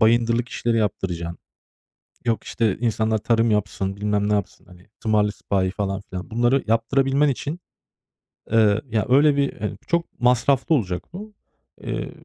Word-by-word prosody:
bayındırlık 115 +1 +3
işleri 115 -1 -1
yaptıracaksın. 85 -5 -2 0.9
Yok, 115 -3 0
işte, 110 -4 0
insanlar 110 -2 0
tarım 115 +1 +2
yapsın, 100 -2 -1
bilmem 105 0 0
ne - - +1
yapsın, 100 -2 -3
hani, 90 +1 -17
tımarlı 105 -1 +2
sipahi 95 -2 -1
falan 100 -1 -3
filan. 90 +2 -6
Bunları 120 +4 +2
yaptırabilmen 135 +6 +2
için, 145 +6 -3 0.9
eee, 110 -2 +4
ya, 110 -3 -1
öyle 145 +3 +5
bir, 140 -1 +1
hani 105 0 -3
çok 170 -5 -2
masraflı 125 +5 +3
olacak 90 -9 -1
bu. 210 +3 -8 0.5
Eee, - - -4
115 Hz, 140 wpm, -23 LUFS, 105-125 Hz, 0.9 s, öyle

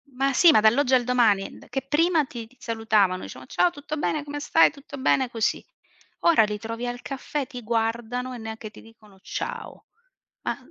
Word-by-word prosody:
Ma 275 +2 +1
sì, 335 +5 +7
ma 295 - +5
dall'oggi 250 +5 +3
al 245 - +3
domani, 230 -6 +2
d - - -17
che 270 +3 -2
prima 310 +3 +2
ti 235 -3 -8
ti 250 - -25
salutavano, 215 -6 +1
dicevano: - - -9
"Ciao, 355 - +3
tutto 295 0 -6
bene, 300 0 -1
come 290 0 -5
stai, 325 - +5
tutto 280 -1 -11
bene", 260 -1 +2
così. 225 -2 -1 0.6
Ora 335 -9 +5
li 210 -1 -2
trovi 230 +2 -5
al 245 0 -5
caffè, 275 0 -4
ti 250 -4 -8
guardano 235 +2 -2
e - - -6
neanche 220 -1 -7
ti - - -15
dicono: 215 -3 -19
"Ciao", 465 - -6 0.6
ma - - -2
245 Hz, 190 wpm, -25 LUFS, 225-285 Hz, 0.6 s, sì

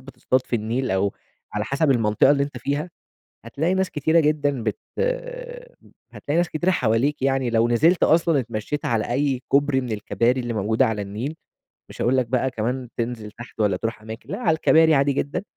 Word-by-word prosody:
بتصطاد 130 -1 -2
في 120 - 0
النيل 115 +4 -2
أو 95 +1 +1 0.4
على 105 0 -1
حسب 140 +4 +1
المنطقة 115 0 +3
اللي 140 -1 +3
أنت 140 -3 -4
فيها، 145 +7 -2 0.5
هتلاقي 155 +10 -1
ناس 190 -1 0
كتيرة 160 +2 +2
جدًا 145 -4 0
بت 110 -2 -2 1.3
هتلاقي 145 - -3
ناس 175 -1 +2
كتيرة 175 +4 0
حواليك 130 0 +1
يعني 135 -2 +1
لو 115 0 +2
نزلت 160 +10 +3
أصلًا 165 -2 +4
اتمشّيت 115 +4 -4
على 115 -1 -1
أي 135 -1 0
كوبري 140 -1 +2
من 125 -3 -5
الكباري 115 +4 0
اللي 120 -1 -3
موجودة 110 +5 +2
على 110 -3 -2
النيل، 110 +10 -5 0.6
مش - - -8
هاقول 130 +2 +2
لك 130 - +2
بقى 130 +2 0
كمان 125 +2 -3
تنزل 115 -3 -4
تحت 120 0 -12
والّا 100 -3 +2
تروح 115 +2 -4
أماكن، 110 +2 -10
لأ - - -4
على 165 -10 +2
الكباري 160 0 +4
عادي 140 +1 +2
جدًا 140 +6 -2
130 Hz, 185 wpm, -23 LUFS, 115-145 Hz, 1.3 s, أصلًا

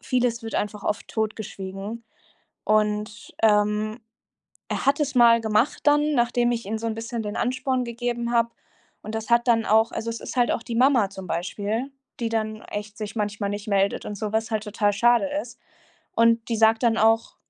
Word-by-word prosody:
Vieles 245 -2 0
wird 225 - -6
einfach 210 -1 -3
oft 210 - -2
totgeschwiegen. 215 0 -5 0.6
Und, 210 0 0
ähm, 210 +1 +2 0.7
er - - -2
hat 280 +2 +3
es 285 -3 -1
mal 235 -1 +6
gemacht 220 +4 +1
dann, 295 +1 +4
nachdem 240 0 +2
ich 230 -3 -3
ihm 220 +2 -2
so 230 - -3
'n 220 - -2
bisschen 230 +1 -4
den 205 - -4
Ansporn 255 0 0
gegeben 235 0 -3
hab. 235 0 +2 0.5
Und 215 - -7
das 220 +1 -5
hat 235 0 +3
dann 225 -2 +3
auch 220 +1 +3
also 230 - -4
es 230 - -4
ist - - -7
halt 245 - +3
auch 230 - -2
die 230 - -5
Mama 245 -5 +4
zum 190 -2 -9
Beispiel, 205 +9 -3 0.3
die 230 -2 -1
dann 215 -1 -2
echt 210 0 -7
sich 215 +1 -6
manchmal 205 -1 -2
nicht 205 +1 -5
meldet 200 -1 +1
und 210 - -5
so, 210 +1 -4
was 220 0 0
halt 215 -1 -1
total 210 -1 0
schade 240 +6 +3
ist. 240 -2 -12 0.6
Und 230 0 +3
die 230 - +1
sagt 220 +1 +4
dann 230 -2 +3
auch 225 +1 +2
225 Hz, 190 wpm, -24 LUFS, 210-235 Hz, 0.7 s, mal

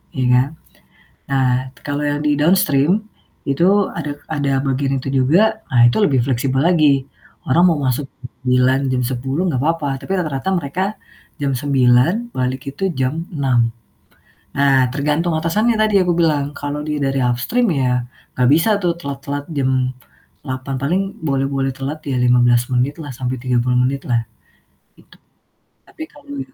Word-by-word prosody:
ya 130 - 0
kan. 125 +2 +4 0.8
Nah 135 -1 +2 0.4
kalau 145 0 -2
yang 145 0 -1
di 150 -1 +3
downstream. 155 -3 +3 0.6
Itu 185 +8 +2
ada 150 -3 -5
ada 140 -3 0
bagian 135 0 0
itu - - -4
juga, 180 +12 +3
nah 120 -4 +4
itu 120 - -1
lebih 135 -9 +2
fleksibel 130 0 0
lagi. 150 -6 +3 0.4
Orang 175 +7 +5
mau 165 - +2
masuk 130 +2 -1
jam 125 -1 -9
9.00, 125 +1 +2
jam 125 -1 0
10.00 135 +5 -2
gak 130 - -1
papa, 160 -2 0
tapi 170 +8 -6
rata-rata 150 -2 -3
mereka 170 +5 -2 0.6
jam 140 -1 0
9.00 135 - +2
balik 130 0 -1
itu 195 +6 -2
jam 150 +6 -1
6.00. 125 -5 +2 0.9
Nah 135 -2 +3
tergantung 150 +4 0
atasannya 210 +9 +1
yang - - +3
tadi 210 -2 +1
aku 180 - 0
bilang, 150 -4 +1
kalau 145 +1 -4
dia 150 -1 -2
dari 135 0 0
upstream 125 - +1
ya 125 -2 +1 0.4
gak 125 -1 +4
bisa 165 +9 +4
tuh 175 -1 +1
telat-telat 140 -2 -5
jam 130 -1 +1 0.7
8.00 130 0 -5
paling 180 +8 +1 0.2
boleh-boleh 135 -1 0
telat 140 +3 -5
ya 135 - -1
15 120 -1 +3
menit 130 +4 +1
lah 145 -3 -7
sampai 125 +1 -3
30 125 -1 +1
menit 135 +2 -1
lah. 120 -1 +2 0.8
Itu. - - -21 0.7
Tapi 315 - -9
kalau 285 -1 -10
140 Hz, 155 wpm, -19 LUFS, 130-160 Hz, 0.9 s, Orang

